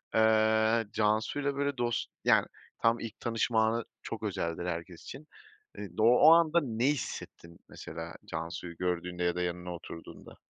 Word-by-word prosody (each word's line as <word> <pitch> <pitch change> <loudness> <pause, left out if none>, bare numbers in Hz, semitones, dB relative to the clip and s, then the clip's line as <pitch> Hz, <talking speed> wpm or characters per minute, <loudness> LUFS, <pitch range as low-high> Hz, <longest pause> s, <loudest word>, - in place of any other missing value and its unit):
eee, 110 0 +4
Cansu'yla, 110 +7 0
böyle, 140 -1 -1
dost 120 -1 -1
yani, - - +4 0.3
tam 115 +1 +3
ilk 115 -2 -7
tanışma 115 -1 +1
anı 115 0 -1 0.2
çok - - -6
özeldir 85 +1 -2
herkes 85 0 -5
için. 150 +3 -10 0.5
Eee, 105 - -6
o - - +3 0.2
o - - +10
anda 170 0 +4
ne 115 -1 -1
hissettin, 95 - -4
mesela, 80 +1 -8
Cansu'yu 85 +1 -6
gördüğünde 90 0 -2
ya 85 0 +1
da 90 - -2
yanına 90 0 -3
oturduğunda? 85 0 -11
110 Hz, 150 wpm, -30 LUFS, 90-115 Hz, 0.5 s, o